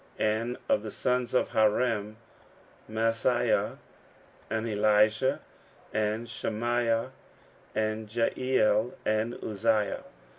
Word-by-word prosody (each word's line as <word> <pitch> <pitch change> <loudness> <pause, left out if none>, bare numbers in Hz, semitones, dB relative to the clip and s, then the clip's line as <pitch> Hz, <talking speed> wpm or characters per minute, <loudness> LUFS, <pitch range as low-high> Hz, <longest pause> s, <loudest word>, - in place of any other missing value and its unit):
15:010:021 110 - +3
And 115 +3 -2
of - - +3
the 110 - -6
sons 125 +3 -1
of - - +2
Harim; 110 -1 +1 0.7
Maaseiah, 115 0 +1 0.7
and 110 +1 -1
Elijah, 105 +3 +3 0.5
and 110 +2 -1
Shemaiah, 115 +1 -1 0.6
and 110 0 -1
Jehiel, 115 -1 +1
and 110 +2 0
Uzziah. 110 0 0
110 Hz, 90 wpm, -29 LUFS, 110-115 Hz, 0.7 s, 15:010:021